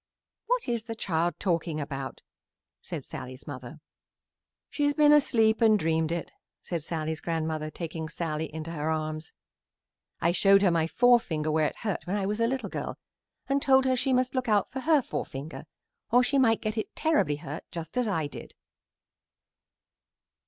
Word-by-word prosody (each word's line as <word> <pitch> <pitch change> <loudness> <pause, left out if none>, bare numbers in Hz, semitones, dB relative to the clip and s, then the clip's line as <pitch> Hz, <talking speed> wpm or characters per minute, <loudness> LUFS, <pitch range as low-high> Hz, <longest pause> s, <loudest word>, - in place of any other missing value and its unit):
"What - - 0
is 235 -2 -1
the 225 -1 -5
child 175 -5 0
talking 170 -4 0
about?" 135 -2 -5 0.6
said - - -6
Sallie's 130 +2 -8
mother. 140 +1 -8 0.9
"She 290 - 0
has 290 0 +2
been 295 -1 +6
asleep 225 -6 +4
and 220 -2 +6
dreamed 160 -2 0
it," 170 -1 -3 0.3
said 170 -4 -3
Sallie's 160 -1 -3
grandmother, 160 -2 -2
taking 160 -1 -5
Sallie 160 -1 -3
in 155 0 -6
her 160 -2 -3
arms. 155 0 -3 0.9
"I 170 - +2
showed 195 +2 +5
her 185 - +5
my 165 -1 +2
forefinger 175 -9 +3
where 155 0 +3
it - - -6
was - - -15
hurt 205 -4 -2
when 190 - -1
I 200 -2 0
was 210 +3 -1
a 230 - +3
little 265 +2 -2
girl - - -4 0.5
and 275 0 +1
told 265 -1 +5
her 260 -1 +3
she 260 +1 0
must 255 0 +2
look 255 -3 -1
out 210 -1 +2
for 265 - -4
her 300 0 +3
forefinger 140 - -5 0.4
or 245 +1 +5
she 275 +2 +2
might 225 -4 +4
get 215 0 -2
it - - -5
terribly 305 - +2
hurt 145 +1 -7
just 165 -1 -7
as 250 -2 +1
I 165 -7 0
did. 145 - -9
175 Hz, 175 wpm, -28 LUFS, 155-240 Hz, 0.9 s, been